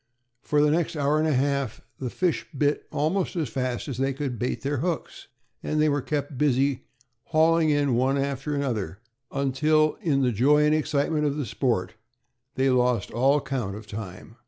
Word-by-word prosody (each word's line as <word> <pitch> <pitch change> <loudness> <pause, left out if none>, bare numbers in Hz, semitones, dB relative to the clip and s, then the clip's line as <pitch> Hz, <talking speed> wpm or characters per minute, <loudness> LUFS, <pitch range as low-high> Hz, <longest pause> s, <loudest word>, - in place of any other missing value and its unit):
For 150 0 +2
the 150 - +4
next 165 +1 0
hour 145 +1 +1
and 155 - +2
a - - +2
half 140 -2 0 0.2
the 130 - -3
fish 180 +6 -1
bit 145 +1 0
almost 180 +6 0
as 160 -7 -1
fast 125 +1 -3
as 130 -4 -5
they 135 +1 +1
could 135 -4 -4
bait 125 - -2
their 140 +1 -1
hooks, 170 +4 -3 0.3
and 155 - -1
they 155 0 +4
were 145 -1 0
kept 145 -2 -3
busy 140 -2 +1 0.4
hauling 160 0 +3
in 145 -3 +2
one 130 +3 +2
after 140 +1 -2
another, 110 - -2 0.3
until, 150 +3 +2
in 140 -5 +1
the 125 - +2
joy 145 +7 +4
and 150 - +3
excitement 150 0 +1
of 145 0 -2
the 145 - -2
sport, 115 -3 -1 0.6
they 135 0 +2
lost 125 -1 +1
all 135 +5 +3
count 120 -9 -3
of 105 0 -9
time. 105 +1 -8
140 Hz, 180 wpm, -25 LUFS, 125-150 Hz, 0.6 s, the